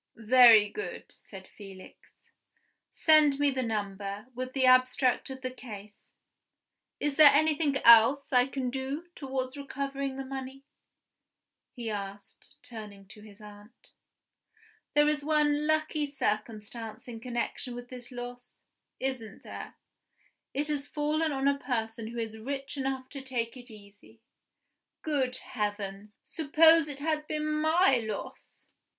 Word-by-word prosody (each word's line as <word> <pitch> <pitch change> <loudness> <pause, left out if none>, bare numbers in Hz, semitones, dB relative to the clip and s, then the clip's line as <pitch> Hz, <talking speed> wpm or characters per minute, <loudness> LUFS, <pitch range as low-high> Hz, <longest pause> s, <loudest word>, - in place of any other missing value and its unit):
"Very 230 -2 +7
good," 420 - -7
said 190 -2 -13
Felix. 195 -2 -15 0.7
"Send 305 -3 +4
me 290 -1 +3
the 260 -1 -2
number, 205 -2 -4
with 255 +1 -5
the 265 -2 +2
abstract 255 0 +3
of 265 0 -8
the 255 -1 -4
case. 210 -5 -11 0.9
Is 290 -1 -2
there 305 -2 +10
anything 300 -1 +2
else 235 +5 +7
I 250 0 +5
can 260 -2 -3
do 270 +6 -4
towards 265 -2 -4
recovering 275 -1 -4
the 270 - -5
money?" 265 0 -7 1.1
he 235 -3 -5
asked, 200 -1 -8
turning 210 -5 -10
to 210 - -13
his 210 0 -15
aunt. 210 +2 -15 1.0
"There 295 0 +5
is 300 -1 0
one 300 -1 +2
lucky 310 -1 0
circumstance 220 -3 -4
in 230 -2 -7
connection 240 +1 -4
with 245 0 -9
this 250 -1 -9
loss 245 0 -9 0.4
isn't 255 -6 -4
there? - - -9 0.8
It 290 +2 -2
has 290 -1 -1
fallen 305 +2 0
on 270 0 -1
a 280 0 +2
person 225 -4 -3
who 235 +1 -8
is 220 -1 -4
rich 275 +4 -5
enough 265 -1 -3
to 275 - -8
take 245 -2 -3
it 250 0 -10
easy. 210 +1 -16 0.8
Good 270 -5 -1
heavens! 205 -3 -5
suppose 320 +1 +4
it 285 -1 -7
had 305 0 -1
been 305 0 -2
my 305 0 +3
loss!" 220 -2 -7
255 Hz, 135 wpm, -29 LUFS, 225-285 Hz, 1.1 s, there